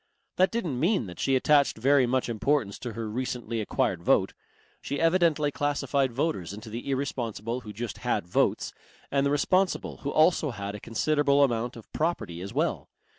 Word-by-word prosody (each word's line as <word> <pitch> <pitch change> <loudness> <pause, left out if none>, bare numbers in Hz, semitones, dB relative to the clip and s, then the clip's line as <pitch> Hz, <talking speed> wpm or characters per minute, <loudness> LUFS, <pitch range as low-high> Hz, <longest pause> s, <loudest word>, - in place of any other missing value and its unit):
That 185 +1 +4
didn't 175 - -2
mean 175 - +2
that 90 -3 -10
she 135 - +2
attached 140 0 +3
very 135 +2 +4
much 130 +1 0
importance 120 -1 0
to 120 -3 -5
her 115 0 -4
recently 115 0 -3
acquired 105 - -1
vote. - - +2 0.5
She 140 - -3
evidently 165 -3 +3
classified 140 -2 0
voters 120 - -2
into 110 +1 -9
the 120 +5 -5
irresponsible 120 -4 -2
who 105 - -8
just 115 +2 -6
had - - -1
votes 90 - 0 0.4
and 140 0 +2
the - - +1
responsible 185 +6 +1
who 140 - -4
also 155 0 +3
had 100 -4 -5
a 105 - -6
considerable 145 +6 +2
amount 120 -2 0
of 115 - -13
property 150 - -2
as 100 +2 -6
well. - - -1
130 Hz, 175 wpm, -27 LUFS, 115-145 Hz, 0.5 s, That